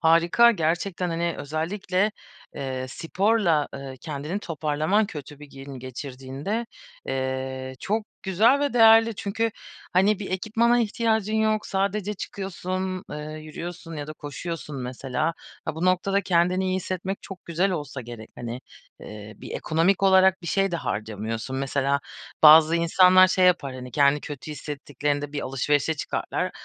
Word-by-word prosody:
Harika, 170 +8 +5
gerçekten, 175 -1 -1
hani, 170 0 -1
özellikle, 185 +7 -1 0.4
eee, 130 -2 -4
sporla, 175 - +1
eee, 135 -1 -7
kendini 150 +5 -4
toparlaman 160 +4 0
kötü 145 -4 -9
bir 145 - -12
gün 135 0 -9
geçirdiğinde, 135 - -5 0.4
eee, 130 0 -3
çok 215 +1 -1 0.2
güzel 220 +9 +4
ve 285 -1 0
değerli. 225 -1 +6
Çünkü, 225 +3 -1 0.4
hani, 195 +3 +3
bir 200 - -6
ekipmana 230 +5 +2
ihtiyacın 220 -1 0
yok, 215 -1 +1
sadece 200 +1 -1
çıkıyorsun, 185 -1 -4
eee, - - -5 0.2
yürüyorsun 165 +2 -7
ya 145 0 -5
da 155 - -6
koşuyorsun 150 0 -6
mesela. 130 +5 -2 0.3
Ha, - - -3
bu 165 +3 -3
noktada 185 +2 +2
kendini 180 +1 +2
iyi 185 0 0
hissetmek 185 +1 -4
çok 190 -2 -10
güzel 175 +4 0
olsa 145 -6 -4
gerek, 115 -2 -10
hani, 120 +1 -5 0.4
eee, 105 0 -9
bir - - -10
ekonomik 175 +5 +1
olarak 190 -1 +5
bir 170 - -8
şey 195 +3 +1
de 170 - -1
harcamıyorsun. 110 +1 -4
Mesela 140 +1 0 0.4
bazı 155 +1 +8
insanlar 185 +2 +6
şey 185 0 +3
yapar, 140 -7 +2
hani, 125 0 -8
kendini 140 +2 +3
kötü 145 +1 -7
hissettiklerinde 145 -1 -3
bir 145 - -2
alışverişe 145 +4 0
çıkarlar 150 - -2
165 Hz, 140 wpm, -25 LUFS, 140-195 Hz, 0.4 s, bazı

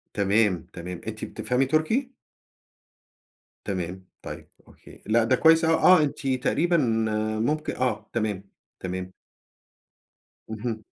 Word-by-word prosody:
تمام، 100 -3 +2
تمام، 90 0 -7
أنتِ - - -5
بتفهمي 125 +2 -1
تُركي؟ 220 - 0 1.5
تمام، 95 -1 -4 0.2
طيب - - -9 0.2
أوكي - - -17
لأ، 115 +1 +3
ده 125 +3 +3
كويس 160 +4 +5
أوي 165 - +3
آه، 180 -4 +6
أنتِ 140 -1 -3
تقريبًا 150 +6 +1 0.6
ممك 150 +6 -1
آه، 110 -4 -2
تمام، 105 -4 -1 0.4
تمام. 95 0 -5 1.4
اهم. 110 0 -4
115 Hz, 110 wpm, -25 LUFS, 100-155 Hz, 1.5 s, آه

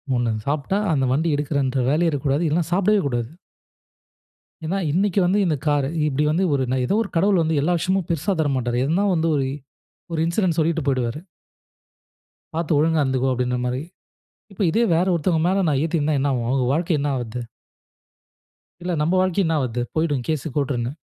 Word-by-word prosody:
ஒண்ணு, 120 -1 0
அத 110 - -3
சாப்பிட்டா 150 +7 0 0.2
அந்த 135 -3 +1
வண்டி 155 +6 +1
எடுக்குறேன்ற 140 -3 -1
வேலையே 165 +4 +2
இருக்கக்கூடாது. 145 +2 0
இல்லனா, 160 +2 +1
சாப்புடவே 200 +3 +3
கூடாது. 120 -4 -2 1.4
ஏன்னா, 180 +5 -1
இன்னக்கி 195 +4 +1
வந்து 190 +4 +2
இந்த 160 -4 +1
காரு 145 -2 +2 0.2
இப்டி 145 0 0
வந்து 170 +5 +1
ஒரு 135 -2 +1
நா 130 - +1
ஏதோ 200 - +1
ஒரு 200 - -8
கடவுள் 195 0 +3
வந்து, 160 -1 0
எல்லா 170 +5 +1
விஷயமும் 185 0 0
பெருசா 170 +4 0
தரமாட்டாரு. 130 -5 -1
எதுனா 175 +8 +1
வந்து, 165 0 +1
ஒரு 135 - 0 0.7
ஒரு 160 - 0
இன்சிடென்ட் 170 0 0
சொல்லிட்டு 165 +1 +1
போய்டுவாரு. 130 -1 0 1.4
"பார்த்து 165 -1 0
ஒழுங்கா 160 0 +2
இருந்துக்கொ," 130 -1 0
அப்படின்ற 125 0 -1
மாரி. 125 +1 -2 0.7
இப்போ 195 - -4
இதே 225 +8 +2
வேற 170 +3 +2
ஒருத்தவங்க 165 0 +1
மேல 190 +1 +1
நான் 140 -3 +1
ஏத்திருந்தா 155 -2 0
என்ன 140 +1 +1
ஆகும்? 120 -2 -2
அவங்க 130 0 +1
வாழ்க்கை 165 +2 +1
என்ன 145 +1 -1
ஆவுறது? 120 -1 -4 1.4
இல்ல 180 +1 -3
நம்ம 160 +4 +1
வாழ்க்கை 185 +1 +1
என்ன 165 0 +1
ஆவுறது? 125 -3 -2
போயிடும் 145 -6 0
கேஸ் 155 -2 -1
கோர்ட்டுன்னு. 130 -3 -1
150 Hz, 175 wpm, -22 LUFS, 135-170 Hz, 1.4 s, சாப்புடவே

